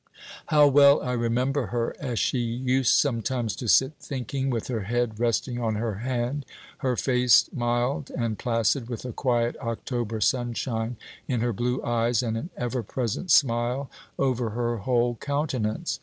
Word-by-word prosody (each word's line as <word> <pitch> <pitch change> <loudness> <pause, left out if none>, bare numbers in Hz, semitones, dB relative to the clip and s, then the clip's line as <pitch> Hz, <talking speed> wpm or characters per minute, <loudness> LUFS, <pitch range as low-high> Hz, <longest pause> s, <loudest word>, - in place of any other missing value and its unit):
How 150 -1 +6
well 140 +1 +6
I 125 - -2
remember 125 +2 0
her, 120 -1 -2
as 125 -5 -3
she 130 - +1
used 125 +2 +1
sometimes 120 -3 0
to 125 - -5
sit 130 +5 +5
thinking, 135 0 -3
with 115 -4 -2
her 115 -6 -3
head 115 -1 -1
resting 120 +1 0
on 110 -2 0
her 105 -2 -2
hand, 125 +3 -2 0.4
her 130 -2 0
face 125 -2 +4
mild 120 +3 -1
and 115 -3 -3
placid, 115 +1 0
with 120 0 -5
a 125 - -4
quiet 120 -2 0
October 115 -1 -3
sunshine 120 -1 -1 0.3
in 125 -4 0
her 120 0 0
blue 125 +4 -1
eyes, 120 0 +1
and 115 -2 -1
an 135 +10 -4
ever 125 +1 -2
present 120 - -3
smile 125 0 +2 0.3
over 125 -4 0
her 120 -1 0
whole 120 +1 +1
countenance. 140 0 -2
120 Hz, 155 wpm, -26 LUFS, 115-130 Hz, 0.4 s, How